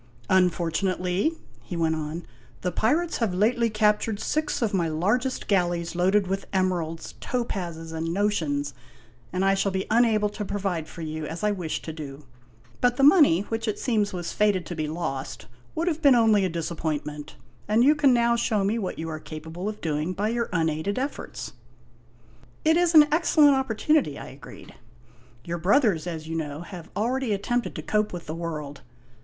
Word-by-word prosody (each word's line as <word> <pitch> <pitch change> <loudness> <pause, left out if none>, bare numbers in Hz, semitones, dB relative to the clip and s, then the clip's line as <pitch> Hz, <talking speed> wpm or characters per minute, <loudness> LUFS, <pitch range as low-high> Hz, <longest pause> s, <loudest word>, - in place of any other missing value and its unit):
" 120 0 -27
Unfortunately," 185 - +1 0.3
he 175 - -6
went 165 -1 +1
on, 155 +2 -4 0.2
" 120 -1 -27
the 180 - 0
pirates 310 - +1
have 215 -7 0
lately 230 +4 +2
captured 210 0 +1
six 310 +5 -1
of 215 - 0
my 175 -4 +1
largest 210 - 0
galleys 175 -3 0
loaded 190 +3 +3
with 195 +1 -3
emeralds, 175 -4 -1
topazes, 175 -10 -3
and 165 +1 -2
notions, 160 -8 0 0.6
and 185 +2 0
I 195 - +4
shall 195 0 +1
be 190 0 -2
unable 220 -2 +3
to 210 0 -5
provide 190 -5 -2
for 165 - -8
you 155 -1 -4
as 165 +6 -6
I 210 - +3
wished 180 -6 -4
to 160 - -5
do. 145 -2 -8 0.6
But 245 0 +3
the 275 - +2
money, 285 - +6
which 225 +2 -4
it 215 - -1
seems 215 -5 0
was 175 -2 -4
fated 205 -4 +2
to 175 - -6
be 155 -1 -2
lost, 145 -7 -4 0.3
would 330 +2 -1
have 325 -2 0
been 280 -4 +6
only 220 -4 +4
a - - 0
disappointment, 155 -3 -4 0.3
and 220 +3 +4
you 290 +4 +6
can 290 -3 +4
now 235 -1 +3
show 220 -3 +1
me 210 +4 0
what 190 - -4
you 165 - -4
are 155 -1 -4
capable 160 +5 -6
of 215 - -8
doing 155 +2 -1
by 205 +4 -1
your 235 0 -1
unaided 165 +2 0
efforts." 275 - -4 0.5
" 120 - -29
It 320 +1 +5
is 345 -1 +2
an 300 -1 +9
excellent 305 -2 +5
opportunity," 265 - +1
I - - -8
agreed. 135 +1 -12 0.4
" 120 0 -28
Your 170 0 -3
brothers, 190 - +3
as 160 -2 -5
you 165 - -4
know, 150 -1 -4
have 175 -1 -9
already 240 +2 0
attempted 235 +5 -1
to - - -5
cope 210 0 0
with 175 -2 -7
the 155 - -5
world." 155 -4 -5
185 Hz, 185 wpm, -26 LUFS, 160-225 Hz, 0.6 s, an